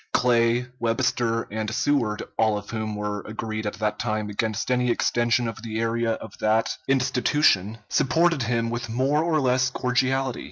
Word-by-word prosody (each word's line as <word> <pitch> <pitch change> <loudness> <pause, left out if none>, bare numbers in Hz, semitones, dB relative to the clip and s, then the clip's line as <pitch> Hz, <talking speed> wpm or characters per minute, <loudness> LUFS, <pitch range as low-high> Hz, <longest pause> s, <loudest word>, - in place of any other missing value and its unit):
Clay, 120 0 +3
Webster, 115 0 0
and 110 0 -2
Seward, 120 -3 0
all 110 -2 +2
of 105 0 -8
whom 110 -1 -3
were 105 0 -3
agreed 110 0 -5
at 105 - -3
that 105 0 -2
time 110 -3 -2
against 110 +3 -2
any 125 0 +2
extension 120 0 +1
of 115 -1 -6
the 110 -1 -4
area 115 0 0
of 110 -2 -8
that 110 +1 +1
institution, 130 -5 +2
supported 165 +5 +2
him 115 -1 0
with 120 0 -4
more 135 +6 +1
or 165 -2 +1
less 130 -1 +2
cordiality. 130 +1 0
115 Hz, 160 wpm, -24 LUFS, 110-125 Hz, -, Clay